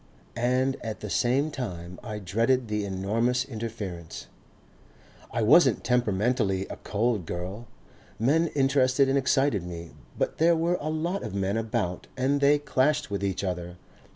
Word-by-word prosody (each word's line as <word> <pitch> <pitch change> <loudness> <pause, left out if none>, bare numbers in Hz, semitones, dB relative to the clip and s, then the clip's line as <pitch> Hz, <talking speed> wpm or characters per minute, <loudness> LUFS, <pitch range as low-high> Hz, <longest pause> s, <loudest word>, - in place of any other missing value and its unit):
And 125 +3 +1
at 110 -2 -5
the 105 - -5
same 135 +5 +2
time 90 -10 -6
I 110 -3 -5
dreaded 115 +5 +1
the 105 -1 -1
enormous 115 +6 0
interference.... 110 - -6 1.1
"I 115 -1 0
wasn't 150 +11 +5
temperamentally 110 -4 +1
a - - -6
cold 105 -4 -1
girl. 95 +6 -5 0.5
Men 155 +9 +3
interested 135 -1 +3
and 135 - +2
excited 135 -5 +2
me, 85 -1 -7 0.3
but - - -1
there 170 +1 +5
were 170 +2 +1
a 155 - -2
lot 170 +5 -1
of 110 -4 -5
men 100 +1 0
about 105 -6 -2
and 140 +2 +1
they 145 +1 +5
clashed 145 -1 +1
with 100 -1 -2
each 100 0 -1
other. 90 -1 -4
115 Hz, 150 wpm, -27 LUFS, 100-135 Hz, 1.1 s, wasn't